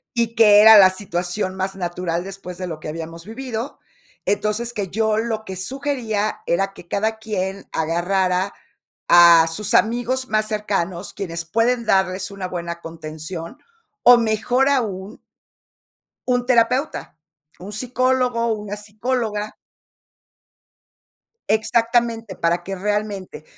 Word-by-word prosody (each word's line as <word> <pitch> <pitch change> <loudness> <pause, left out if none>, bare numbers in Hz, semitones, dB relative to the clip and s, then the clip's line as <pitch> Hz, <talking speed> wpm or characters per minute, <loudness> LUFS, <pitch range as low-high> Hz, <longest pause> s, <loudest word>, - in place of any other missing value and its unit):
Y 230 -1 0
que 210 -3 +7
era 220 +1 +9
la 190 -2 +8
situación 185 0 -3
más 190 0 -3
natural 175 -1 -3
después 190 -2 -9
de 185 - -4
lo 160 -3 -6
que - - -7
habíamos 165 +1 -7
vivido. 235 +2 -6 0.5
Entonces, 210 +3 -1
que 205 -5 -3
yo 220 +2 0
lo 220 -1 -2
que 190 -3 -7
sugería 230 -1 -2
era 195 +3 0
que 175 - -14
cada 220 +3 -1
quien 195 -3 -4
agarrara 180 +3 0 0.6
a 170 -1 +8
sus 200 +5 -3
amigos 245 +3 +1
más 215 0 +1
cercanos, 200 -4 -2
quienes 170 -4 -5
pueden 230 +7 +1
darles 190 -2 +1
una 195 -2 -5
buena 170 -1 -5
contención, 165 - -8 0.4
o 245 0 +8
mejor 235 +4 +1
aún 210 -6 -2 1.1
un 245 -1 +1
terapeuta, 250 - +1 0.4
un 195 +3 -9
psicólogo, 250 0 0
una 210 -1 -5
psicóloga. 210 0 -3 1.9
Exactamente, 230 -2 +1
para 170 +1 0
que 195 +2 -5
realmente, 205 -3 -3
205 Hz, 120 wpm, -21 LUFS, 180-230 Hz, 1.9 s, era